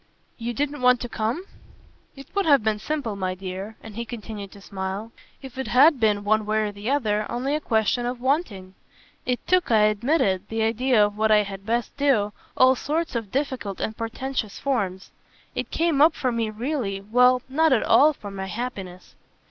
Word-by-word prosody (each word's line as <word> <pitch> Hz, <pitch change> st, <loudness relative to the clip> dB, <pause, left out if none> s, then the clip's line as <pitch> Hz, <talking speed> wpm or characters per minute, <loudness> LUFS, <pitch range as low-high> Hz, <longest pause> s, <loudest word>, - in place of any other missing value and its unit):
"You 235 Hz, +1 st, -3 dB
didn't 290 Hz, +2 st, -2 dB
want 250 Hz, -1 st, +5 dB
to 245 Hz, -, -3 dB
come?" 230 Hz, +11 st, -2 dB, 0.7 s
"It 275 Hz, -1 st, -11 dB
would 400 Hz, -3 st, 0 dB
have 280 Hz, -7 st, +5 dB
been 215 Hz, -1 st, 0 dB
simple, 280 Hz, -6 st, -3 dB
my 185 Hz, -2 st, -2 dB
dear" 190 Hz, +3 st, -7 dB
and 220 Hz, -2 st, -10 dB
he 235 Hz, -, -3 dB
continued 215 Hz, -3 st, -7 dB
to 200 Hz, -, -13 dB
smile 195 Hz, +3 st, -5 dB, 0.3 s
"if 265 Hz, -1 st, -9 dB
it 265 Hz, -, -3 dB
had 275 Hz, +3 st, +5 dB
been, 210 Hz, -2 st, +2 dB
one 215 Hz, +1 st, +2 dB
way 215 Hz, 0 st, +1 dB
or -, -, -7 dB
the 205 Hz, +3 st, -5 dB
other, 215 Hz, -7 st, 0 dB
only 260 Hz, +4 st, -1 dB
a 305 Hz, -, +1 dB
question 230 Hz, 0 st, +1 dB
of 245 Hz, 0 st, -4 dB
'wanting.' 245 Hz, -, -1 dB, 0.5 s
It 250 Hz, -1 st, -1 dB
took, 365 Hz, 0 st, +2 dB
I 220 Hz, -2 st, +5 dB
admit 215 Hz, +9 st, +2 dB
it, 190 Hz, 0 st, 0 dB
the 225 Hz, 0 st, -1 dB
idea 230 Hz, 0 st, +3 dB
of 205 Hz, 0 st, -5 dB
what 220 Hz, 0 st, +3 dB
I 210 Hz, -1 st, +5 dB
had 195 Hz, 0 st, -8 dB
best 235 Hz, +1 st, -1 dB
do, 240 Hz, -8 st, +2 dB, 0.2 s
all 260 Hz, 0 st, +6 dB
sorts 320 Hz, +6 st, -2 dB
of 225 Hz, -4 st, -3 dB
difficult 260 Hz, -8 st, -2 dB
and 220 Hz, -, -3 dB
portentous 230 Hz, -1 st, -4 dB
forms. 200 Hz, -9 st, -2 dB, 0.4 s
It -, -, -4 dB
came 325 Hz, -4 st, +1 dB
up 315 Hz, +1 st, +6 dB
for 255 Hz, -, -1 dB
me 230 Hz, -2 st, -1 dB
really 220 Hz, -3 st, -3 dB
well, 250 Hz, +4 st, +4 dB
not 315 Hz, +4 st, +2 dB
at 250 Hz, -, +3 dB
all 300 Hz, +2 st, +6 dB
for 205 Hz, -8 st, -9 dB
my 190 Hz, -1 st, -5 dB
happiness." 190 Hz, -5 st, -6 dB
230 Hz, 195 wpm, -24 LUFS, 205-265 Hz, 0.7 s, all